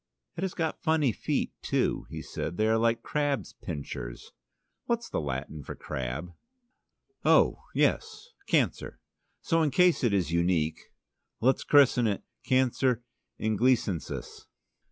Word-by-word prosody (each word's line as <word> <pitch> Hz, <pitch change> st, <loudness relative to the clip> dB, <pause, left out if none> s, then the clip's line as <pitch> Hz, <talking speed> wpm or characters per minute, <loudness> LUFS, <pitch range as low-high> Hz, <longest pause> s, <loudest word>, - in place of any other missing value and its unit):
"It 170 Hz, -, -5 dB
has 190 Hz, -2 st, -2 dB
got 160 Hz, -2 st, -2 dB
funny 160 Hz, -5 st, +2 dB
feet, -, -, -1 dB
too," -, -, 0 dB
he -, -, -6 dB
said. 85 Hz, -, -5 dB
"They 110 Hz, -, +2 dB
are 110 Hz, 0 st, +3 dB
like 115 Hz, 0 st, +1 dB
crabs' 145 Hz, -2 st, -1 dB
pincers. 65 Hz, -6 st, -7 dB, 0.5 s
What's 235 Hz, 0 st, -1 dB
the -, -, -2 dB
Latin 70 Hz, +2 st, -4 dB
for -, -, -7 dB
crab?" 65 Hz, +7 st, -5 dB, 0.9 s
"Oh, -, -, +4 dB
yes, 480 Hz, -, 0 dB, 0.2 s
Cancer. -, -, 0 dB, 0.4 s
So 165 Hz, -1 st, +2 dB
in 155 Hz, -, +3 dB
case 175 Hz, +3 st, +4 dB
it 120 Hz, -, +3 dB
is 95 Hz, -4 st, +1 dB
unique, 85 Hz, -2 st, +1 dB, 0.6 s
let's 130 Hz, +3 st, +2 dB
christen 130 Hz, -5 st, +5 dB
it: 100 Hz, -2 st, -1 dB, 0.2 s
'Cancer 130 Hz, -1 st, +2 dB, 0.4 s
Inglisensis.'" 110 Hz, -4 st, 0 dB
115 Hz, 130 wpm, -28 LUFS, 85-145 Hz, 0.9 s, christen